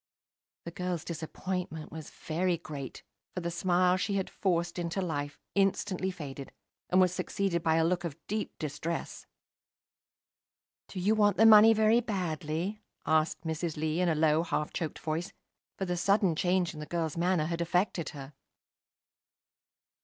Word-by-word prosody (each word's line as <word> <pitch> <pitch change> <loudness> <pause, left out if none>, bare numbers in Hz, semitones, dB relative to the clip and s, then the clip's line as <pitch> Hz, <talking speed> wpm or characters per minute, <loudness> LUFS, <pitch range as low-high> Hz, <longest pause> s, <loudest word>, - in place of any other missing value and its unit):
The 170 - -5
girl's 180 -2 -3
disappointment 170 0 -4
was 160 -1 -8
very 175 +2 -1
great, 140 -5 -8 0.3
for 180 - -2
the 170 0 -2
smile 180 +1 +2
she 195 +1 -1
had 190 -1 -2
forced 175 -2 0
into 175 +2 -2
life 145 -5 -3 0.2
instantly 195 -1 +1
faded, 140 -6 -7 0.4
and 185 - +4
was 185 -1 +4
succeeded 185 -2 -1
by 160 -1 +2
a 160 0 +3
look 175 +1 0
of 165 -4 -4
deep 215 +1 -3
distress. 155 +2 -4 1.6
"Do 190 - -6
you 200 +4 +3
want 205 -2 +3
the 225 - +6
money 220 0 +9
very 220 +2 +4
badly?" 180 -1 -3 0.2
asked 155 0 +2
Mrs. 160 0 -3
Lee, 155 +3 0
in 180 - +3
a 160 - +2
low, 155 0 +3
half 150 -3 -2
choked 160 -3 -3
voice, 160 +2 -3 0.4
for 190 - -2
the 180 -1 -1
sudden 195 -2 +3
change 180 +1 +1
in 155 - -9
the 150 - -6
girl's 165 -3 -2
manner 175 -2 +1
had 170 +1 -2
affected 175 0 0
her. 140 0 -9
170 Hz, 155 wpm, -30 LUFS, 160-185 Hz, 1.6 s, money